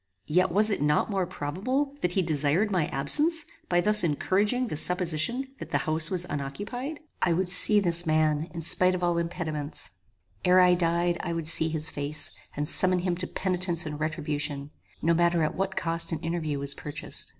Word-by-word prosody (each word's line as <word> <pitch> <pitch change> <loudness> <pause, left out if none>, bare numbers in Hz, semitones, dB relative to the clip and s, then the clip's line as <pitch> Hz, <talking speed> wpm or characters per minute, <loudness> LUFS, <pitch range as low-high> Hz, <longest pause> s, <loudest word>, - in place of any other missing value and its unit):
Yet 180 +3 +1
was 210 +4 +4
it 200 - -2
not 150 +7 +1
more 190 -3 -1
probable 210 - -3
that 180 - -1
he 190 - +1
desired 160 +6 +1
my 175 -6 0
absence 300 - +2 0.2
by 175 0 +2
thus 210 +1 +4
encouraging 200 - 0
the 220 - -5
supposition 180 - +1
that - - -8
the - - +1
house 160 0 +1
was 180 -2 +2
unoccupied? 205 - -6 0.2
I 175 - +2
would 180 +1 -1
see 205 +3 +5
this 170 -3 0
man 155 +1 +1
in 165 - -6
spite 185 +3 +3
of 180 - -5
all 175 -1 +1
impediments; 160 -3 -4 0.5
ere 180 +1 +5
I 180 -1 +5
died, 175 0 0
I 170 - -3
would 165 -2 -4
see 160 0 +3
his 155 -1 +1
face, 145 +2 -1 0.3
and 145 0 -2
summon 185 +2 +4
him 180 0 -1
to 185 - -3
penitence 180 -3 0
and 150 -1 -6
retribution; 150 -2 -3 0.3
no 170 - +3
matter 170 0 +2
at 155 - -1
what 190 0 -3
cost 165 +1 -1
an 165 - -1
interview 165 -3 -3
was 140 0 +1
purchased. 150 +1 -5
170 Hz, 190 wpm, -26 LUFS, 155-185 Hz, 0.5 s, see